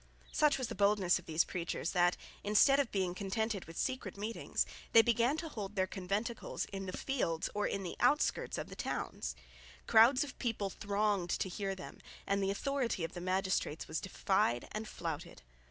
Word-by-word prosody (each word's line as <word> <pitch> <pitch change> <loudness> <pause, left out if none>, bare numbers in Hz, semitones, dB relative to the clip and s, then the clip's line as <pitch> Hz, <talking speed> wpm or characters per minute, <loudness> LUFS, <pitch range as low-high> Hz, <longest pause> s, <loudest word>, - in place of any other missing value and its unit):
Such 300 -2 +3
was 260 -3 -2
the - - -5
boldness 200 -3 +3
of 180 - -16
these 160 +1 +3
preachers 170 -2 -3
that, 175 -1 +3 0.3
instead 215 +7 +5
of 275 -5 +1
being 185 -3 0
contented 200 +1 -2
with 165 +1 -11
secret 260 -5 -2
meetings, 215 +3 -1 0.3
they 225 - +9
began 235 +5 +2
to 325 - -4
hold 210 -8 -6
their 190 -1 +2
conventicles 200 +5 -3
in 195 -1 -6
the - - -3
fields 165 -12 -1
or 205 0 0
in 200 - -2
the 180 - -5
outskirts 295 - +2
of - - -5
the - - -8
towns. - - -3 0.5
Crowds 235 +4 +6
of 285 - -9
people 215 -5 -1
thronged 200 -3 0
to 190 - 0
hear 195 +1 -3
them, 185 - -9 0.3
and 200 0 +1
the 195 - +1
authority 240 -2 -1
of 165 - -3
the 175 - -6
magistrates 185 -3 0
was 160 - -2
defied 190 - +1
and 215 +1 -4
flouted. 165 - -5
200 Hz, 185 wpm, -34 LUFS, 185-230 Hz, 0.5 s, they